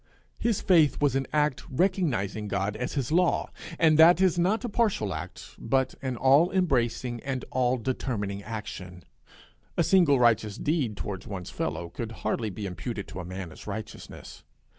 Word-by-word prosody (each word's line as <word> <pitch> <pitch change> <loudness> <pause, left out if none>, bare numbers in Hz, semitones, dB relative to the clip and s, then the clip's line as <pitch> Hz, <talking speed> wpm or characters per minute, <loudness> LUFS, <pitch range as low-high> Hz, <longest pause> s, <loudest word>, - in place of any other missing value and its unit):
His 230 -4 0
faith 165 -6 +4
was 145 -3 +2
an 135 -1 0
act 150 -3 +1
recognizing 130 - 0
God 100 +1 -1
as 125 +3 -4
his 135 -1 -2
law, 180 +2 +2 0.3
and 160 -2 +4
that 170 +2 +8
is 185 -2 +3
not 200 +8 +1
a - - -1
partial 205 - 0
act, 80 - -8
but 130 +2 0
an 130 -2 -2
all 140 +8 +5
embracing 125 -9 0
and 135 -2 -4
all 130 0 +1
determining 110 -5 -3
action. 95 -5 -7 0.7
A 170 - +4
single 165 -5 +4
righteous 110 -3 +2
deed 140 -9 -1
toward 95 -2 -5
one's 95 -3 -6
fellow 85 - -3
could 115 +4 -6
hardly 110 -2 0
be 100 +1 -6
imputed 100 +2 -5
to - - -7
a 90 - -6
man 90 -1 -6
as - - -13
righteousness. - - -8
125 Hz, 165 wpm, -27 LUFS, 105-160 Hz, 0.7 s, that